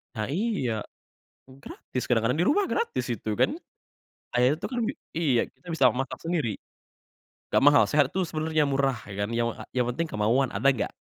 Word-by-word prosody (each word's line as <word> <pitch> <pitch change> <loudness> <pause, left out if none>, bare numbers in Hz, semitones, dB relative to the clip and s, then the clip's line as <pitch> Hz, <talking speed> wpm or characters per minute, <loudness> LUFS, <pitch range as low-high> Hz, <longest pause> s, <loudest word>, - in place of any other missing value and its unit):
Nah 110 -1 -2
iya, 155 - -1 0.8
gratis 125 - -6
kadang-kadang 125 +4 +1
di - - +2
rumah 400 +7 +3
gratis 465 0 -1
itu - - -6
kan. - - +3 0.9
Air 125 +3 +4
tuh - - -3
kan 250 - -4
bi 245 - -2 0.2
iya 140 -8 +3
kita - - -24
bisa 135 -6 +5
masak 135 +3 -4
sendiri. 160 - -1 1.0
Gak - - +5
mahal, 145 +1 +7
sehat 145 -2 +2
tuh 190 -1 -1
sebenernya 155 -1 0
murah 135 -2 +1
ya 100 - -8
kan, 100 - -1
yang 115 0 0
a - - -9
yang 125 -1 +2
penting 165 +4 -2
kemauan, 115 +5 +1
ada 115 +8 +1
gak? 120 - -3
135 Hz, 180 wpm, -27 LUFS, 120-165 Hz, 1.0 s, mahal